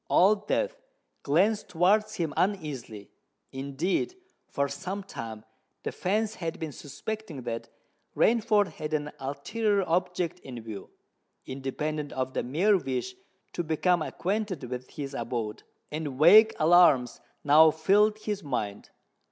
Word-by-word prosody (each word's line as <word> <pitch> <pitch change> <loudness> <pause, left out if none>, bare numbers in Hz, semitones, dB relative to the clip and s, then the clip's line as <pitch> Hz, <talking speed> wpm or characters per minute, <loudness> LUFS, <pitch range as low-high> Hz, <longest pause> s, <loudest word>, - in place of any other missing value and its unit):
Old 205 +3 +4
Death - - 0 0.4
glanced 195 +9 +2
towards 210 +5 +2
him 160 -4 -2
uneasily. 145 - -2 0.4
Indeed, 145 - -2 0.3
for 140 0 -1
some 185 +8 -5
time 110 - -8 0.4
the - - -2
fence 215 +3 -1
had 165 -6 -5
been 160 -2 -4
suspecting 150 - -7
that 115 -1 -5 0.5
Rainford 215 -3 +3
had 155 0 -3
an 150 0 -3
ulterior 200 +10 -1
object 180 0 -1
in 125 -6 -8
view, 110 -3 -8 0.6
independent 145 +3 -4
of 130 0 -2
the - - 0
mere 185 +11 +2
wish 135 +5 -3 0.4
to 175 - -2
become 165 +2 +1
acquainted 195 +1 -2
with 125 0 -6
his 140 -1 -6
abode; 115 -3 -3 0.3
and 150 -3 -4
vague 210 +9 +7
alarms 155 -7 +5 0.2
now 155 +2 +7
filled 205 +7 +3
his 210 -2 -4
mind. 105 -7 -4
160 Hz, 125 wpm, -28 LUFS, 135-200 Hz, 0.6 s, vague